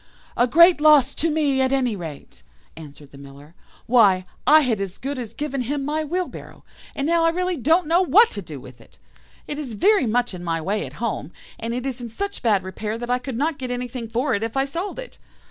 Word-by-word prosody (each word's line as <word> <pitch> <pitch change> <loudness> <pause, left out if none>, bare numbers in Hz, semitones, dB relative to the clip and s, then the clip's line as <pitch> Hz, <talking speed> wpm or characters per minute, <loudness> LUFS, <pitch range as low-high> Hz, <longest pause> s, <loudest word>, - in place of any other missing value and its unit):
"'A 245 - +3
great 335 +4 +6
loss 295 -3 +5
to 330 - -1
me 295 -4 +1
at 260 0 +1
any 255 -5 +1
rate,' 160 - -9 0.3
answered 145 -2 -13
the 140 - -14
Miller; 140 +3 -14 0.3
'why, 200 -7 +4 0.2
I 310 +1 +7
had 230 -7 0
as 195 -1 -5
good 275 +1 -5
as 235 -4 -7
given 275 -3 -3
him 275 +3 -3
my 305 +2 -1
wheelbarrow, 355 +4 -5 0.3
and 275 - -2
now 335 +1 +2
I 330 - +4
really 360 +2 -1
don't 320 +6 +2
know 335 +4 +3
what 420 +5 +5
to 200 - -6
do 155 -6 -9
with 125 -1 -14
it. - - -21 0.5
It 295 - -5
is 265 -6 -6
very 390 - +3
much 240 0 0
in 175 -1 -8
my 165 -1 -1
way 195 +6 -2
at - - -12
home, 215 -8 -4 0.3
and 230 +1 -3
it 250 +1 -4
is 260 -2 -4
in 240 - -6
such 400 - -5
bad 210 -6 +2
repair 210 +4 -5
that 240 +1 -4
I 250 - +1
could 255 -2 -6
not 300 +2 -1
get 255 -1 -5
anything 245 -1 -5
for 250 +4 0
it 205 - -1
if 225 +3 -3
I 270 - +2
sold 340 +8 -5
it. - - -9
250 Hz, 230 wpm, -22 LUFS, 210-300 Hz, 0.5 s, I